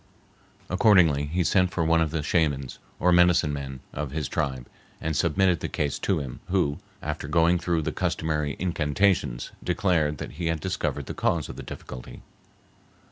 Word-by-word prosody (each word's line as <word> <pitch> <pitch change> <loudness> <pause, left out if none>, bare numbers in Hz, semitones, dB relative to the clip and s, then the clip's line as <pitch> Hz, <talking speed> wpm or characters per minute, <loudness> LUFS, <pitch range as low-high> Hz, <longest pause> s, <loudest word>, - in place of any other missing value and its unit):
Accordingly, 90 -8 +4
he 90 +4 0
sent 90 +3 +3
for 85 -3 -1
one 80 0 +3
of 80 - +1
the 80 -1 -2
shamans, 70 -6 0 0.2
or 90 - +3
medicine 90 -3 +4
men, 65 -2 -6
of 75 -1 -3
his 75 0 -3
tribe, 65 -3 -2 0.3
and 80 -1 -2
submitted 85 +2 +2
the - - -4
case 75 -2 -2
to - - +1
him, 70 -5 -5
who, 90 -6 +1 0.2
after - - -4
going 85 +1 +3
through 85 -2 0
the 80 - -1
customary 75 -1 -1
incantations, 80 -5 0
declared 80 -6 +1
that - - -6
he 85 +2 -4
had 80 -1 0
discovered 95 +3 -2
the - - -5
cause 85 -3 0
of - - -7
the - - -7
difficulty. 65 -1 -9
80 Hz, 170 wpm, -26 LUFS, 75-90 Hz, 0.3 s, Accordingly